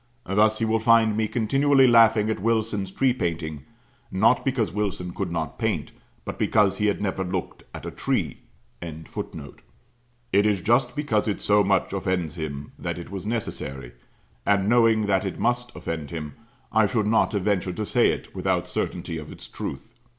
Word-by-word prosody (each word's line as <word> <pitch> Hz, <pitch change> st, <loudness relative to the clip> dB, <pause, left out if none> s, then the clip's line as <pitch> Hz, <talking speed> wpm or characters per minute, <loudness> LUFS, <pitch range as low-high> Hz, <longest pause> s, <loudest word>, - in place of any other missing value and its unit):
Thus 105 Hz, +3 st, +3 dB
he 115 Hz, -, 0 dB
will 110 Hz, 0 st, +1 dB
find 115 Hz, -1 st, +4 dB
me 110 Hz, 0 st, +1 dB
continually 135 Hz, +5 st, +3 dB
laughing 115 Hz, -3 st, +5 dB
at 110 Hz, -, -3 dB
Wilson's 110 Hz, -3 st, 0 dB
tree 130 Hz, +6 st, +2 dB
painting; 80 Hz, -, -3 dB, 0.5 s
not 110 Hz, +6 st, +3 dB
because 125 Hz, -8 st, 0 dB
Wilson 95 Hz, -3 st, -3 dB
could 95 Hz, -4 st, -3 dB
not 80 Hz, -3 st, -3 dB
paint, -, -, -1 dB, 0.3 s
but -, -, -6 dB
because 100 Hz, -3 st, +3 dB
he 105 Hz, -, +1 dB
had 100 Hz, -, 0 dB
never 95 Hz, -1 st, -1 dB
looked 90 Hz, -1 st, -4 dB
at -, -, -9 dB
a -, -, -4 dB
tree.] -, -, -2 dB, 0.4 s
It 80 Hz, -1 st, -7 dB, 1.3 s
is 100 Hz, 0 st, +3 dB
just 120 Hz, +4 st, +2 dB
because 140 Hz, -9 st, 0 dB
it 105 Hz, -, -1 dB
so 105 Hz, 0 st, +3 dB
much 95 Hz, -1 st, +1 dB
offends 95 Hz, -5 st, -1 dB
him, 75 Hz, -4 st, -6 dB
that -, -, -3 dB
it 85 Hz, +2 st, -8 dB
was 100 Hz, 0 st, -5 dB
necessary: 70 Hz, -, -4 dB, 0.5 s
and 100 Hz, +3 st, +2 dB
knowing 115 Hz, -2 st, +4 dB
that 95 Hz, -2 st, +2 dB
it 95 Hz, -3 st, -4 dB
must 120 Hz, +1 st, 0 dB
offend 80 Hz, -4 st, -5 dB
him, 75 Hz, -2 st, -6 dB, 0.4 s
I 110 Hz, -1 st, +4 dB
should 110 Hz, -1 st, 0 dB
not 110 Hz, +1 st, +2 dB
have 100 Hz, -3 st, -1 dB
ventured 95 Hz, -3 st, 0 dB
to 110 Hz, -, -2 dB
say -, -, +3 dB
it, -, -, -4 dB
without -, -, 0 dB
certainty 85 Hz, -2 st, -3 dB
of 75 Hz, -, -9 dB
its -, -, -10 dB
truth. -, -, -7 dB
105 Hz, 175 wpm, -25 LUFS, 90-110 Hz, 1.3 s, laughing